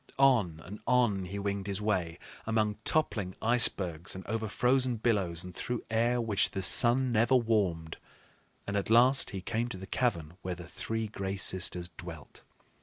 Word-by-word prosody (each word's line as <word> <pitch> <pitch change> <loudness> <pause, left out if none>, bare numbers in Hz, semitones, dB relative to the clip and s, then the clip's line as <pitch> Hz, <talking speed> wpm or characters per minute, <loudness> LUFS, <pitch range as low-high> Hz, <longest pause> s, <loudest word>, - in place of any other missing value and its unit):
On 115 -12 +3
and 100 +4 -9
on 115 -6 +2
he 95 +3 -6
winged 100 0 -3
his 100 -1 -2
way, 95 -6 -1 0.3
among 110 -2 0
toppling 105 -12 +1
icebergs 95 -9 +2
and 95 - -8
over 110 +1 -3
frozen 125 +3 +1
billows 100 -7 0
and 90 0 -9
through 120 +6 -4
air 120 +2 +1
which 110 -4 +1
the 95 - -5
sun 125 +5 +3
never 115 +3 +3
warmed, 100 -9 0 0.7
and 100 - -4
at 100 0 -2
last 125 +4 +5
he 95 - -6
came 115 +5 -2
to 110 - -6
the 95 - -8
cavern 90 -9 -2
where 90 0 -4
the 85 0 -10
three 110 +5 -4
Gray 100 -2 -4
Sisters 90 -1 +1
dwelt. 85 -5 -10
105 Hz, 170 wpm, -30 LUFS, 90-120 Hz, 0.7 s, last